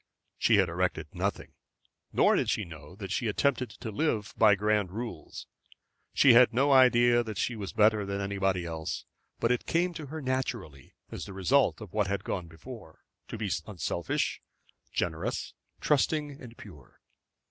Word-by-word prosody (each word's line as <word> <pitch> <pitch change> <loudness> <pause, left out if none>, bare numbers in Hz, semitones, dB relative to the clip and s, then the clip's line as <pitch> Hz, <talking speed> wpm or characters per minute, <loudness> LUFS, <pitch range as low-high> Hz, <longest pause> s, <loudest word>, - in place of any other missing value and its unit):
She - - +4
had - - +4
erected - - -2
nothing. - - -3 0.6
Nor - - +4
did - - 0
she - - 0
know 80 0 -12
that 100 -2 -7
she 115 - -1
attempted 125 +3 0
to 115 -3 -8
live 105 -4 -1
by 105 -2 +6
grand 105 -1 +1
rules. 115 +4 -7 0.7
She 135 -3 +6
had 120 +1 +7
no 140 +3 +3
idea 120 -2 +6
that 110 -4 -6
she 120 - -1
was 100 -3 -5
better 105 0 +3
than 100 0 -3
anybody 95 -2 -1
else; 80 -1 -5 0.3
but 115 - +1
it 125 - -1
came 175 +2 +1
to 155 -3 -7
her 160 +3 -6
naturally 125 - -4 0.2
as - - -6
the 100 - -9
result 120 +8 +2
of 105 -5 -10
what 105 -3 +1
had 100 0 -2
gone 90 -3 -4
before, 80 0 -12 0.2
to - - -6
be 105 -3 -3 0.2
unselfish, 85 -4 -2 0.5
generous, 80 -2 -2 0.3
trusting, 150 0 +1
and 120 -2 -11
pure. 75 -10 -14
110 Hz, 165 wpm, -29 LUFS, 95-125 Hz, 0.7 s, had